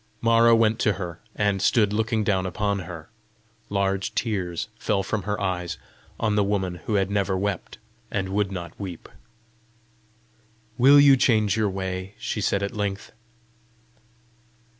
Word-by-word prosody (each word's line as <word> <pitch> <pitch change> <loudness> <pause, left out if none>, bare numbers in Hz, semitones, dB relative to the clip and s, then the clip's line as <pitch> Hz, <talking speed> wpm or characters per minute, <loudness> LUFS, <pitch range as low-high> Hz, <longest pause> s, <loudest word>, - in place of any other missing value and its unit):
Mara 115 0 +5
went 115 0 +2
to 105 - +2
her, 90 -3 -6 0.2
and 100 -2 0
stood 105 -5 +3
looking 110 0 0
down 95 -3 +1
upon 100 +2 -1
her. 85 -3 -8 0.6
Large 100 -1 -1
tears 95 -4 -2
fell 100 -3 0
from 105 +2 -2
her 105 - -1
eyes 90 -3 -2 0.4
on 110 -2 +1
the 105 - +3
woman 95 -3 -1
who 110 - 0
had 95 -1 +1
never 100 -2 0
wept, 100 +1 -3 0.3
and 95 -1 -2
would 100 0 0
not 85 -3 -7
weep. 95 -5 -7 1.7
"Will 135 +3 +7
you 140 -1 +7
change 110 -6 +2
your 110 -2 +1
way?" 95 0 -5
she - - -3
said 100 - 0
at 100 - -4
length. 100 -1 -3
100 Hz, 145 wpm, -24 LUFS, 95-110 Hz, 1.7 s, Will